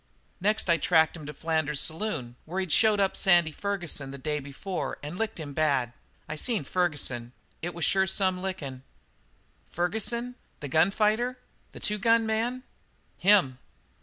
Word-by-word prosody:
"Next 210 Hz, +3 st, +1 dB
I 170 Hz, -1 st, +4 dB
tracked 160 Hz, 0 st, +3 dB
him 155 Hz, -3 st, -9 dB
to -, -, -4 dB
Flanders's 155 Hz, -3 st, 0 dB
saloon, 160 Hz, -, -4 dB
where 180 Hz, +4 st, -3 dB
he'd 185 Hz, -4 st, -2 dB
showed 215 Hz, +2 st, +5 dB
up 195 Hz, -1 st, +2 dB
Sandy 175 Hz, -4 st, +4 dB
Ferguson 175 Hz, -7 st, -3 dB
the 140 Hz, -, -7 dB
day 150 Hz, +2 st, -2 dB
before 145 Hz, +7 st, -5 dB
and 150 Hz, +4 st, -5 dB
licked 220 Hz, -1 st, -3 dB
him 145 Hz, -3 st, -6 dB
bad. 140 Hz, -6 st, +1 dB, 0.3 s
I 155 Hz, -, -4 dB
seen 225 Hz, -, 0 dB
Ferguson. 135 Hz, -8 st, -1 dB, 0.3 s
It 175 Hz, +1 st, -4 dB
was 170 Hz, -, 0 dB
sure 190 Hz, 0 st, +3 dB
some 190 Hz, -1 st, +1 dB
lickin'." 150 Hz, -9 st, -5 dB, 0.9 s
"Ferguson? 220 Hz, +7 st, -1 dB, 0.3 s
The 145 Hz, -, -6 dB
gun 160 Hz, +7 st, +4 dB
fighter? 220 Hz, +5 st, +1 dB, 0.4 s
The -, -, -9 dB
two 210 Hz, 0 st, -1 dB
gun 230 Hz, +2 st, +4 dB
man?" 230 Hz, +3 st, -1 dB, 0.6 s
"Him." 180 Hz, -10 st, +4 dB
175 Hz, 160 wpm, -28 LUFS, 150-210 Hz, 0.9 s, showed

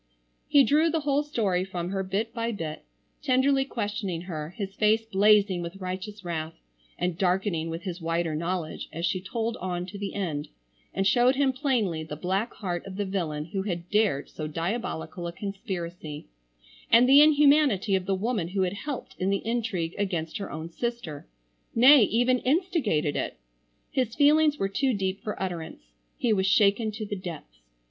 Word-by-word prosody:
He 285 Hz, -1 st, +6 dB
drew 305 Hz, +5 st, +3 dB
the 325 Hz, 0 st, 0 dB
whole 285 Hz, 0 st, +2 dB
story 210 Hz, -11 st, 0 dB
from 180 Hz, -2 st, -4 dB
her 195 Hz, -1 st, -1 dB
bit 200 Hz, +4 st, -2 dB
by 230 Hz, -1 st, -2 dB
bit, 160 Hz, -, -6 dB, 0.4 s
tenderly 270 Hz, 0 st, +3 dB
questioning 205 Hz, -8 st, -3 dB
her, 160 Hz, -4 st, -5 dB
his 195 Hz, -3 st, -4 dB
face 220 Hz, +2 st, +2 dB
blazing 205 Hz, -3 st, +4 dB
with 170 Hz, +2 st, -6 dB
righteous 190 Hz, +2 st, -6 dB
wrath, 160 Hz, -2 st, -3 dB, 0.4 s
and 180 Hz, -1 st, -2 dB
darkening 180 Hz, -3 st, 0 dB
with 165 Hz, +2 st, -5 dB
his 180 Hz, -2 st, -5 dB
wider 165 Hz, 0 st, -1 dB
knowledge 170 Hz, +1 st, -3 dB
as 170 Hz, +1 st, -3 dB
she 180 Hz, +1 st, 0 dB
told 230 Hz, +4 st, -3 dB
on 180 Hz, -1 st, -3 dB
to 200 Hz, +2 st, -9 dB
the 200 Hz, -1 st, -4 dB
end, 160 Hz, -7 st, -2 dB, 0.4 s
and 195 Hz, -, -1 dB
showed 245 Hz, +6 st, +4 dB
him 270 Hz, -1 st, +2 dB
plainly 240 Hz, -, 0 dB
the 155 Hz, -1 st, -6 dB
black 190 Hz, +8 st, -1 dB
heart 175 Hz, -4 st, -3 dB
of 190 Hz, -, -7 dB
the 205 Hz, +1 st, -2 dB
villain 165 Hz, -6 st, -2 dB
who 195 Hz, -, 0 dB
had 175 Hz, -3 st, -4 dB
dared 210 Hz, -10 st, +2 dB
so 155 Hz, -, -6 dB
diabolical 170 Hz, +1 st, -3 dB
a -, -, -4 dB
conspiracy; 175 Hz, -6 st, -6 dB, 0.6 s
and 235 Hz, +2 st, +6 dB
the 275 Hz, +2 st, +8 dB
inhumanity 290 Hz, -9 st, +5 dB
of 185 Hz, -1 st, -2 dB
the 195 Hz, -, +2 dB
woman 210 Hz, -3 st, -1 dB
who 190 Hz, +2 st, 0 dB
had 180 Hz, 0 st, -1 dB
helped 270 Hz, +6 st, -6 dB
in 185 Hz, -, 0 dB
the 200 Hz, +1 st, -1 dB
intrigue 215 Hz, -8 st, -1 dB
against 175 Hz, -5 st, -2 dB
her 200 Hz, -, -5 dB
own 160 Hz, +2 st, -5 dB
sister,—nay 170 Hz, -, +2 dB
even 245 Hz, +4 st, +2 dB
instigated 260 Hz, -, +1 dB
it. -, -, -3 dB, 0.5 s
His 250 Hz, -4 st, -1 dB
feelings 300 Hz, +1 st, +4 dB
were 195 Hz, -, 0 dB
too 255 Hz, +5 st, 0 dB
deep 190 Hz, 0 st, -2 dB
for 210 Hz, -, -5 dB
utterance. 165 Hz, -, -5 dB, 0.3 s
He 235 Hz, -3 st, +2 dB
was 190 Hz, -2 st, +1 dB
shaken 205 Hz, +2 st, +3 dB
to 215 Hz, +1 st, -5 dB
the 205 Hz, -, -4 dB
depths. 165 Hz, -, -8 dB
195 Hz, 175 wpm, -27 LUFS, 170-235 Hz, 0.6 s, the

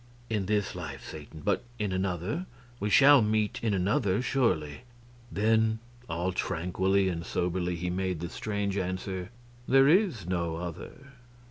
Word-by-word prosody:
"In 105 Hz, -4 st, 0 dB
this 105 Hz, -2 st, 0 dB
life, 80 Hz, -6 st, -7 dB
Satan, 75 Hz, 0 st, -9 dB
but -, -, +1 dB
in 105 Hz, -4 st, -1 dB
another? 95 Hz, -, -2 dB, 0.3 s
We 105 Hz, -, -1 dB
shall 140 Hz, +4 st, +7 dB
meet 105 Hz, -1 st, +1 dB
in 110 Hz, -, +2 dB
another, 95 Hz, +1 st, +1 dB
surely?" 95 Hz, -, 0 dB, 0.5 s
Then, 110 Hz, +1 st, +2 dB, 0.3 s
all 85 Hz, +3 st, -1 dB
tranquilly 95 Hz, +2 st, 0 dB
and 85 Hz, -2 st, -2 dB
soberly, 90 Hz, 0 st, -1 dB
he 90 Hz, +1 st, -3 dB
made 95 Hz, -2 st, -1 dB
the 85 Hz, -, -3 dB
strange 100 Hz, -1 st, -2 dB
answer, 95 Hz, 0 st, -3 dB, 0.4 s
"There 135 Hz, +1 st, +6 dB
is 165 Hz, -, +3 dB
no 85 Hz, -2 st, -1 dB
other." 90 Hz, -, -8 dB
95 Hz, 140 wpm, -29 LUFS, 90-110 Hz, 0.5 s, shall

